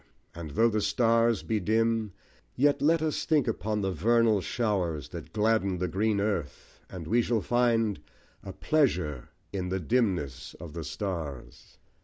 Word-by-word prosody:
and 85 Hz, -2 st, -7 dB
though 115 Hz, -, +5 dB
the 110 Hz, -2 st, 0 dB
stars 115 Hz, 0 st, +2 dB
be 110 Hz, -1 st, -1 dB
dim, 110 Hz, +1 st, +1 dB, 0.4 s
Yet 145 Hz, +2 st, +2 dB
let 160 Hz, +2 st, +3 dB
us 155 Hz, -1 st, -1 dB
think 150 Hz, -5 st, +2 dB
upon 110 Hz, -1 st, -1 dB
the 95 Hz, -1 st, -1 dB
vernal 110 Hz, +4 st, +3 dB
showers 90 Hz, -9 st, -1 dB
That -, -, -9 dB
gladden 105 Hz, -3 st, +1 dB
the 90 Hz, +1 st, -1 dB
green 105 Hz, +2 st, 0 dB
earth, 100 Hz, -8 st, -3 dB
and 90 Hz, -3 st, -7 dB
we 115 Hz, +8 st, +2 dB
shall 115 Hz, -1 st, 0 dB
find 115 Hz, -3 st, +1 dB, 0.4 s
A 95 Hz, -, -7 dB
pleasure 90 Hz, -, 0 dB, 0.2 s
in 90 Hz, -2 st, -3 dB
the 95 Hz, +1 st, -1 dB
dimness 90 Hz, -, -1 dB
of 80 Hz, -3 st, -10 dB
the 85 Hz, -1 st, -5 dB
stars. 75 Hz, -9 st, -6 dB
105 Hz, 155 wpm, -28 LUFS, 90-115 Hz, 0.4 s, though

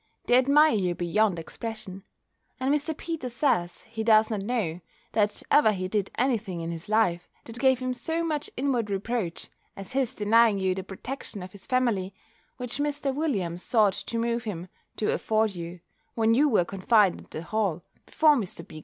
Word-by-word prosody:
They 245 Hz, -, +4 dB
admire 285 Hz, +5 st, +5 dB
you 185 Hz, -5 st, 0 dB
beyond 180 Hz, +2 st, +1 dB
expression; 195 Hz, +2 st, -6 dB, 0.6 s
and 265 Hz, +2 st, +1 dB
Mr. 300 Hz, +1 st, -1 dB
Peters 305 Hz, -8 st, -5 dB
says, 180 Hz, -, +1 dB
he 220 Hz, 0 st, -6 dB
does 220 Hz, 0 st, +5 dB
not 210 Hz, -2 st, -1 dB
know, 195 Hz, -6 st, -2 dB, 0.3 s
that 210 Hz, -1 st, +1 dB
ever 220 Hz, -8 st, +6 dB
he 185 Hz, -1 st, -3 dB
did 200 Hz, 0 st, -1 dB
any 250 Hz, -1 st, +2 dB
thing 185 Hz, -5 st, -6 dB
in 165 Hz, 0 st, -4 dB
his 170 Hz, +4 st, -6 dB
life, 200 Hz, -6 st, +1 dB
that 230 Hz, +1 st, -9 dB
gave 260 Hz, 0 st, +4 dB
him 255 Hz, 0 st, -2 dB
so 320 Hz, +7 st, -2 dB
much 305 Hz, -3 st, -2 dB
inward 250 Hz, -5 st, 0 dB
reproach, 200 Hz, -2 st, -3 dB, 0.3 s
as 195 Hz, -1 st, -7 dB
his 260 Hz, -1 st, 0 dB
denying 220 Hz, 0 st, +4 dB
you 190 Hz, -1 st, +1 dB
the 190 Hz, -, -4 dB
protection 200 Hz, +2 st, -7 dB
of 185 Hz, -, -9 dB
his 200 Hz, 0 st, -12 dB
family, 230 Hz, -7 st, 0 dB, 0.4 s
which 250 Hz, +2 st, -4 dB
Mr. 290 Hz, -1 st, -1 dB
Williams 200 Hz, -, -1 dB
sought 210 Hz, -3 st, +3 dB
to 230 Hz, -, -4 dB
move 235 Hz, 0 st, 0 dB
him 185 Hz, -5 st, -5 dB, 0.3 s
to 215 Hz, -, 0 dB
afford 220 Hz, -1 st, +1 dB
you, 170 Hz, 0 st, -7 dB, 0.3 s
when 225 Hz, 0 st, +3 dB
you 290 Hz, +5 st, +4 dB
were 210 Hz, -8 st, +3 dB
confined 195 Hz, +1 st, +2 dB
at -, -, -18 dB
the 155 Hz, -, -6 dB
Hall, 190 Hz, -4 st, -1 dB, 0.2 s
before 310 Hz, -2 st, +4 dB
Mr. 185 Hz, -, -3 dB
B. 155 Hz, -, -10 dB
220 Hz, 185 wpm, -27 LUFS, 185-255 Hz, 0.6 s, ever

